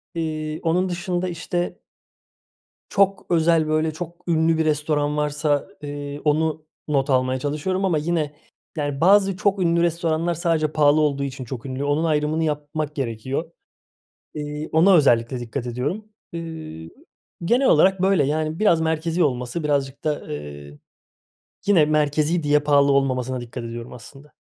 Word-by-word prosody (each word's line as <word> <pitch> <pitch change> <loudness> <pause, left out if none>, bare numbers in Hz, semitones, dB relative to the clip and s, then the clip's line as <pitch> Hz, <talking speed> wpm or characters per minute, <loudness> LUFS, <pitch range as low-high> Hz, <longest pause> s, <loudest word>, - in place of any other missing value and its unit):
Eee, 155 -1 -3
onun 180 +3 +1
dışında, 175 +1 -2
işte 175 +1 -3 1.1
çok 195 -1 +1
özel, 165 -2 +3
böyle, 155 +1 +1
çok 170 +2 -9
ünlü 160 -1 +2
bir 160 - +2
restoran 150 -1 0
varsa, 150 0 0
eee, 145 0 -6
onu 155 +1 0 0.2
not 140 -1 +1
almaya 130 0 +2
çalışıyorum 155 +7 -2
ama 175 -5 +2
yine, 155 -1 -1 0.4
yani, 145 -2 -2
bazı 195 +2 +4
çok 200 -1 +1
ünlü 170 0 +2
restoranlar 170 0 0
sadece 160 -2 0
pahalı 150 0 +4
olduğu 140 -2 +1
için 135 -1 -5
çok 125 +1 -7
ünlü, 130 +1 -4
onun 145 +3 +1
ayrımını 155 0 +1
yapmak 150 0 -3
gerekiyor. 130 +5 -3 0.8
Eee, 150 0 -5
ona 180 +5 +5
özellikle 120 -5 +3
dikkat 120 +1 -5
ediyorum. 145 - -3 0.3
Iıı, 160 - -7 0.6
genel 250 +8 +3
olarak 190 +4 +4
böyle, 190 -5 +3
yani, 155 +2 -1
biraz 170 -6 +3
merkezî 160 +2 0
olması, 125 +2 -2
birazcık 140 -2 -1
da, 150 - -2
eee, 75 0 -9 0.9
yine 190 -6 +5
merkezî 155 +2 +1
diye 150 0 +3
pahalı 140 -1 +3
olmamasına 130 -2 0
dikkat 120 0 -7
ediyorum 115 +1 -7
aslında. 135 +5 -14
150 Hz, 140 wpm, -22 LUFS, 140-165 Hz, 1.1 s, ona